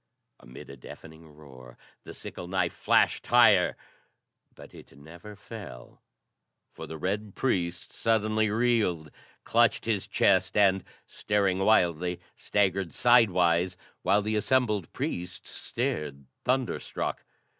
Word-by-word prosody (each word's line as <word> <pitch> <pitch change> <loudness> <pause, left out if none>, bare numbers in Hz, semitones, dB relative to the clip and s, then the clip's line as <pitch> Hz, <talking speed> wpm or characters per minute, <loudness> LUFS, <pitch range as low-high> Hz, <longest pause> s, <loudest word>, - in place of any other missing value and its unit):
Amid 60 - -12
a - - -10
deafening 80 +5 -13
roar 65 -5 -15 0.3
the - - -10
sickle 85 - -8
knife 90 -2 -1
flashed - - +1
higher; - - +5 0.8
but - - -14
it 70 - -15
never 85 +8 -12
fell, 100 - -11 0.7
for - - -9
the 80 - -7
red 100 +4 -3
priest 85 -9 -2
suddenly 110 -1 +1
reeled, 105 - 0 0.3
clutched 115 0 +2
his 110 -4 -1
chest 95 0 +2
and, 95 -2 +3 0.2
staring 100 -3 -1
wildly, 90 -4 +2 0.2
staggered 95 -3 0
sidewise, 90 -7 +3 0.2
while 100 +3 +2
the 110 +1 -1
assembled 105 - 0
priests 90 +1 -5
stared 70 -2 -4 0.2
thunderstruck. 130 -1 -2
95 Hz, 115 wpm, -27 LUFS, 85-110 Hz, 0.8 s, higher